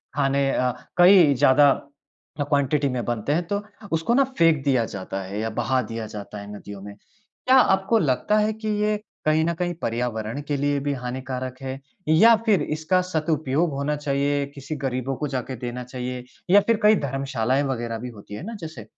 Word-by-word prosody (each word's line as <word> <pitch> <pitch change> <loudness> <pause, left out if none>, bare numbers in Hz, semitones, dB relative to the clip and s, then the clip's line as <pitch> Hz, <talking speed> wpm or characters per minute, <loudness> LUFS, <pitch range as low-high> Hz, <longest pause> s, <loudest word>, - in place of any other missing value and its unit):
खाने 140 -1 +1
अ, 125 0 +1 0.3
कई 175 -4 +7
ज़्यादा 140 +1 +5 0.7
क्वांटिटी 145 0 +1
में 125 -2 -2
बनते 120 +3 -2
हैं, 170 +3 +1
तो 205 +2 -2 0.3
उसको 165 +8 +1
ना 275 +3 +5
फेंक 165 -4 +4
दिया 130 -5 +2
जाता 95 -1 -5
है 100 +2 -5
या 110 +1 -1
बहा 130 0 +1
दिया 115 -1 -4
जाता 105 0 -8
है 100 0 -9
नदियों 100 -1 -9
में। 100 0 -9
क्या 215 - -3
आपको 195 -1 +3
लगता 155 +7 +1
है 215 +1 +2
कि 220 0 -7
ये 210 0 +1 0.3
कहीं 155 +1 +3
न 170 - 0
कहीं 175 +1 -2
पर्यावरण 115 +1 -2
के 145 -2 0
लिए 145 0 0
भी 145 - +1
हानिकारक 130 0 -5
है? 135 0 -5 0.3
या 215 +10 +7
फिर 205 -7 +3
इसका 155 +5 0
सदुपयोग 160 -2 0
होना 140 +2 -1
चाहिए, 145 0 0
किसी 140 +2 -6
गरीबों 135 -2 -2
को 150 - -3
जा 135 -2 -2
के 130 +2 -7
देना 125 +1 -5
चाहिए 125 0 -5 0.3
या 200 +3 +7
फिर 230 -2 +3
कई 210 +1 +7
धर्मशालाएँ 135 -1 0
वगैरह 120 -4 -3
भी 125 +2 -6
होती 105 -3 -12
हैं 105 - -7
ना 230 +2 -6
जैसे, 155 -9 -7
140 Hz, 190 wpm, -24 LUFS, 125-160 Hz, 0.7 s, कई